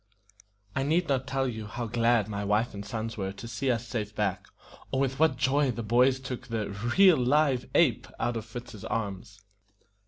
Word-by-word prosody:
I 135 Hz, -, +1 dB
need 160 Hz, +5 st, +1 dB
not 135 Hz, -1 st, 0 dB
tell 135 Hz, -1 st, 0 dB
you 110 Hz, -3 st, -5 dB
how 120 Hz, +4 st, -4 dB
glad 115 Hz, -1 st, +2 dB
my 100 Hz, -1 st, -3 dB
wife 105 Hz, +4 st, +1 dB
and 100 Hz, 0 st, -6 dB
sons 110 Hz, +2 st, -4 dB
were 95 Hz, -1 st, -2 dB
to 110 Hz, +4 st, -9 dB
see 120 Hz, +4 st, -2 dB
us 120 Hz, -1 st, 0 dB
safe 105 Hz, -4 st, -4 dB
back, 100 Hz, -3 st, -1 dB, 0.4 s
or 130 Hz, -, -1 dB
with 135 Hz, 0 st, 0 dB
what 155 Hz, -5 st, +3 dB
joy 140 Hz, +1 st, +2 dB
the 115 Hz, -1 st, -3 dB
boys 125 Hz, +4 st, +3 dB
took 130 Hz, -2 st, -6 dB
the 110 Hz, -4 st, -3 dB, 0.3 s
"real 190 Hz, -4 st, +7 dB
live 130 Hz, 0 st, +2 dB
ape" 135 Hz, -10 st, +3 dB
out 120 Hz, -, 0 dB
of 115 Hz, -, -3 dB
Fritz's 115 Hz, -2 st, -9 dB
arms. 100 Hz, -1 st, -4 dB
120 Hz, 190 wpm, -28 LUFS, 110-135 Hz, 0.4 s, real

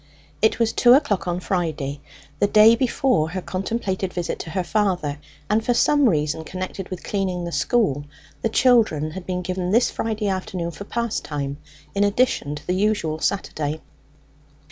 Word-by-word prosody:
It 220 Hz, -, +3 dB
was 230 Hz, -1 st, +1 dB
two 245 Hz, 0 st, +6 dB
o'clock 255 Hz, -, +2 dB
on 175 Hz, 0 st, -1 dB
Friday, 155 Hz, -7 st, -2 dB, 0.4 s
the 205 Hz, -, +4 dB
day 215 Hz, +2 st, +7 dB
before 235 Hz, -, +1 dB
her 185 Hz, +3 st, -3 dB
contemplated 190 Hz, +1 st, -2 dB
visit 175 Hz, -1 st, -3 dB
to -, -, -6 dB
her 185 Hz, +2 st, -1 dB
father, 180 Hz, -7 st, 0 dB, 0.3 s
and 215 Hz, +2 st, +1 dB
for 245 Hz, +1 st, +1 dB
some 290 Hz, 0 st, +4 dB
reason 155 Hz, -2 st, 0 dB
connected 185 Hz, +2 st, -6 dB
with 185 Hz, -, -6 dB
cleaning 185 Hz, -3 st, -2 dB
the 170 Hz, -, -4 dB
school 145 Hz, -, +1 dB, 0.4 s
the 225 Hz, -, +1 dB
children 220 Hz, -, +3 dB
had 180 Hz, +2 st, -8 dB
been 180 Hz, -1 st, -2 dB
given 180 Hz, 0 st, -2 dB
this 230 Hz, +6 st, +3 dB
Friday 215 Hz, -2 st, -2 dB
afternoon 185 Hz, -3 st, -2 dB
for 200 Hz, +5 st, -9 dB
pastime, 150 Hz, -12 st, -3 dB, 0.4 s
in 200 Hz, -, +2 dB
addition 205 Hz, -, +1 dB
to 150 Hz, 0 st, -10 dB
the 180 Hz, -, 0 dB
usual 185 Hz, -6 st, 0 dB
Saturday. 155 Hz, -6 st, -2 dB
185 Hz, 165 wpm, -23 LUFS, 160-215 Hz, 0.4 s, day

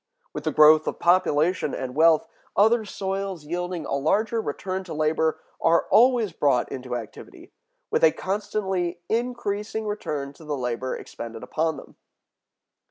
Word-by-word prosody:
With 150 Hz, -, -6 dB
the 155 Hz, -, +1 dB
growth 155 Hz, +1 st, +6 dB
of -, -, -2 dB
population 170 Hz, -2 st, +2 dB
and 130 Hz, -1 st, -5 dB
wealth, 160 Hz, +2 st, +4 dB, 0.3 s
other 220 Hz, +2 st, +4 dB
soils 195 Hz, -4 st, -4 dB
yielding 175 Hz, +1 st, -3 dB
a -, -, -4 dB
larger 210 Hz, +11 st, +1 dB
return 190 Hz, +3 st, -4 dB
to 170 Hz, -, -7 dB
labor 155 Hz, +1 st, +1 dB, 0.2 s
are 165 Hz, +1 st, +3 dB
always 235 Hz, -3 st, +5 dB
brought 140 Hz, -6 st, +1 dB
into 125 Hz, -2 st, -5 dB
activity, 115 Hz, -3 st, -9 dB, 0.4 s
with -, -, +1 dB
a 160 Hz, -, +7 dB
constantly 190 Hz, -3 st, -2 dB
increasing 220 Hz, -2 st, -2 dB
return 150 Hz, -10 st, -4 dB
to 160 Hz, -, -16 dB
the 150 Hz, -2 st, -3 dB
labor 125 Hz, 0 st, -2 dB
expended 115 Hz, -1 st, -8 dB
upon 160 Hz, 0 st, -1 dB
them." -, -, -13 dB
165 Hz, 145 wpm, -25 LUFS, 150-200 Hz, 0.4 s, a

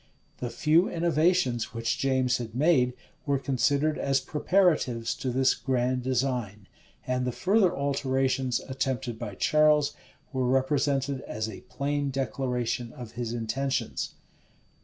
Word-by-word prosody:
[*] -, -, -38 dB
The 125 Hz, -, -3 dB
few 160 Hz, +8 st, +3 dB
innovations 165 Hz, -8 st, +1 dB
which 115 Hz, 0 st, -1 dB
James 130 Hz, -2 st, +2 dB
had 115 Hz, -2 st, -7 dB
made, 130 Hz, -3 st, +3 dB, 0.3 s
were 140 Hz, -1 st, +2 dB
considered 140 Hz, +3 st, +1 dB
as 135 Hz, 0 st, +2 dB
preparatives 150 Hz, -9 st, +1 dB
to 130 Hz, -, -2 dB
this 130 Hz, +1 st, +3 dB
grand 125 Hz, +1 st, 0 dB
design; 120 Hz, -6 st, -2 dB, 0.4 s
and 125 Hz, 0 st, 0 dB
the 125 Hz, -, -1 dB
further 190 Hz, -, +3 dB
alterations 135 Hz, -2 st, 0 dB
attempted 130 Hz, -3 st, -3 dB
by 105 Hz, -5 st, -5 dB
Charles, 150 Hz, +3 st, +3 dB, 0.4 s
were 130 Hz, -1 st, 0 dB
represented 135 Hz, +1 st, +1 dB
as 110 Hz, +1 st, -3 dB
a 110 Hz, -, -8 dB
plain 145 Hz, 0 st, -1 dB
declaration 125 Hz, -3 st, -2 dB
of 120 Hz, -3 st, -9 dB
his 120 Hz, -1 st, -4 dB
intentions. 120 Hz, +4 st, -2 dB
130 Hz, 130 wpm, -27 LUFS, 120-140 Hz, 0.4 s, few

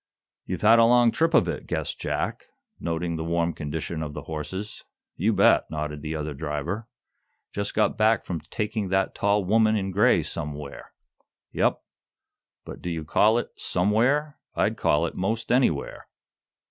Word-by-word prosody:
"You've 90 Hz, +2 st, -4 dB
had 115 Hz, +2 st, +7 dB
a 115 Hz, -, +7 dB
long 120 Hz, 0 st, +5 dB
trip 165 Hz, +4 st, +1 dB
of 90 Hz, -, +5 dB
it," 80 Hz, -5 st, -4 dB
guessed -, -, -3 dB
Jack, -, -, -3 dB, 0.3 s
noting 85 Hz, 0 st, -2 dB
the 80 Hz, -, -3 dB
warm 85 Hz, 0 st, 0 dB
condition 80 Hz, +2 st, -4 dB
of 75 Hz, -2 st, -5 dB
the 75 Hz, -, -6 dB
horses. 80 Hz, +8 st, -6 dB, 0.3 s
"You 105 Hz, +6 st, +1 dB
bet," -, -, +4 dB
nodded 75 Hz, -1 st, -4 dB
the 80 Hz, +1 st, -4 dB
other 75 Hz, -1 st, -3 dB
driver. 80 Hz, +9 st, -4 dB, 0.7 s
"Just 100 Hz, 0 st, -3 dB
got 110 Hz, -, +1 dB
back 110 Hz, +1 st, +3 dB
from 85 Hz, -4 st, -4 dB
taking 105 Hz, -2 st, -2 dB
the 95 Hz, 0 st, +1 dB
tall 100 Hz, -1 st, +1 dB
woman 110 Hz, +2 st, +3 dB
in 95 Hz, -2 st, -1 dB
gray 100 Hz, +3 st, +4 dB
somewhere." 75 Hz, -1 st, -6 dB, 0.6 s
"Yep. -, -, +1 dB, 0.8 s
But -, -, -9 dB
do 90 Hz, -, -4 dB
you 80 Hz, -2 st, -4 dB
call 110 Hz, +8 st, +4 dB
it 120 Hz, -, -2 dB
'somewhere'? 120 Hz, +11 st, +1 dB, 0.2 s
I'd -, -, +1 dB
call 75 Hz, +3 st, +2 dB
it -, -, -4 dB
most 110 Hz, +5 st, -2 dB
anywhere." 125 Hz, -, +1 dB
90 Hz, 160 wpm, -25 LUFS, 80-110 Hz, 0.8 s, had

